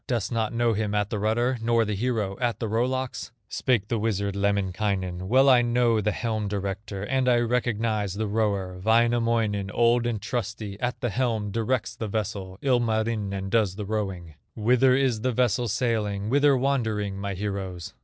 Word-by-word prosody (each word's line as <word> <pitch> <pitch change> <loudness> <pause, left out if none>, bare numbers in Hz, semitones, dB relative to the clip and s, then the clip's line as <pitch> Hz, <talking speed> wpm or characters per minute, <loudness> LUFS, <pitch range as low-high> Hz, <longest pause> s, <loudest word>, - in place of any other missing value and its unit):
Dost 120 -5 -1
not 115 -2 0
know 115 0 +1
him 105 -1 -1
at 105 -1 0
the 110 - -1
rudder, 120 +4 +1
Nor 115 0 +2
the 105 - -2
hero 105 -2 -1
at 120 -2 -1
the 115 - -2
row 115 +3 +1
locks?" 130 -1 -3 0.2
Spake 120 -6 0
the 115 -1 -1
wizard, 100 -2 -1
Lemminkainen: 95 -2 -1
"Well 130 +5 +5
I 130 -2 +7
know 120 -2 +2
the 105 - +1
helm 110 -1 -2
director, 100 0 -4
And 130 +3 +1
I 120 - +4
recognize 115 -4 0
the 110 +1 -1
rower; 100 -4 -1
Wainamoinen, 115 -3 +2
old 120 +2 +2
and 115 -3 -1
trusty, 105 -2 -4
At 125 +1 -3
the 120 -4 -1
helm 110 -4 -1
directs 115 +4 -1
the 110 - -4
vessel; 100 -3 -4
Ilmarinen 110 -6 0
does 105 -5 +2
the 105 0 -5
rowing. 95 -6 -3 0.2
Whither 125 +4 +4
is 130 -5 +1
the 130 +2 +1
vessel 120 0 +1
sailing, 105 -2 -1
Whither 140 0 +4
wandering, 110 -7 -1
my 100 -1 -3
heroes?" 95 -3 -4
110 Hz, 175 wpm, -26 LUFS, 100-120 Hz, 0.2 s, I